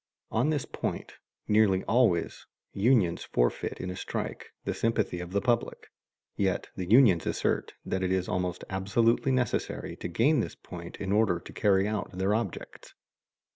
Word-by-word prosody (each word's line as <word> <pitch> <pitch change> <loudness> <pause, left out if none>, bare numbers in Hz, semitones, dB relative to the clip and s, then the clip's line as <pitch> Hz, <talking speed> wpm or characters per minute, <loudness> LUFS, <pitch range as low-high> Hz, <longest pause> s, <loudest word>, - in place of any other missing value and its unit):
On 120 +7 +2
this 150 -4 0
point, - - -4 0.3
nearly 105 -3 +3
always, 110 -8 +1 0.3
unions 100 -5 +2
forfeit - - -1
in 90 - -4
a - - -6
strike - - -5
the - - -1
sympathy 110 -6 0
of 90 0 -7
the 100 +1 +1
public; 120 -2 -1 0.4
yet 95 -2 0
the 90 -2 -5
unions 110 -8 +5
assert - - -1
that 95 - -2
it 95 0 0
is 95 -1 0
almost 90 -1 -2
absolutely 115 +7 +1
necessary 125 -3 -1
to - - -5
gain 125 - +3
this - - -3
point 85 -1 -9
in 95 -1 -3
order 105 -4 +3
to - - -12
carry 100 -1 +3
out 105 -2 -3
their 95 +2 +1
objects. 110 -4 -4
100 Hz, 160 wpm, -28 LUFS, 90-115 Hz, 0.4 s, unions